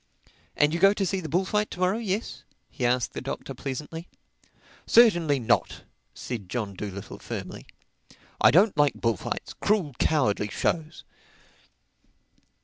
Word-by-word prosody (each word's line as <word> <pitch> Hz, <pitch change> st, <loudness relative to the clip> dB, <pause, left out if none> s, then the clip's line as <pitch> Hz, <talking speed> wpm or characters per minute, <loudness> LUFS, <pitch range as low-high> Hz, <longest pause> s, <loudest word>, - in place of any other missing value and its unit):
"And 145 Hz, +1 st, +3 dB
you 170 Hz, -, -1 dB
go 195 Hz, +2 st, +6 dB
to 195 Hz, -, 0 dB
see 190 Hz, +1 st, -1 dB
the 160 Hz, -4 st, -6 dB
bullfight 190 Hz, +6 st, 0 dB
to -, -, -9 dB
morrow, 185 Hz, +4 st, +1 dB
yes?" 210 Hz, 0 st, -3 dB, 0.3 s
he 125 Hz, -, -1 dB
asked 125 Hz, -1 st, 0 dB
the -, -, -5 dB
Doctor -, -, -5 dB
pleasantly. 155 Hz, +5 st, -6 dB, 0.8 s
"Certainly 175 Hz, -, +5 dB
not," 115 Hz, -, 0 dB, 0.3 s
said 110 Hz, -7 st, -6 dB
John 105 Hz, -4 st, -3 dB
Dolittle 100 Hz, 0 st, -7 dB
firmly. -, -, -7 dB, 0.7 s
"I -, -, +8 dB
don't 190 Hz, +5 st, +4 dB
like 145 Hz, -1 st, +3 dB
bullfights—cruel, 145 Hz, -, -1 dB
cowardly 130 Hz, -9 st, +1 dB
shows." 160 Hz, +8 st, -2 dB
155 Hz, 130 wpm, -26 LUFS, 125-190 Hz, 0.8 s, I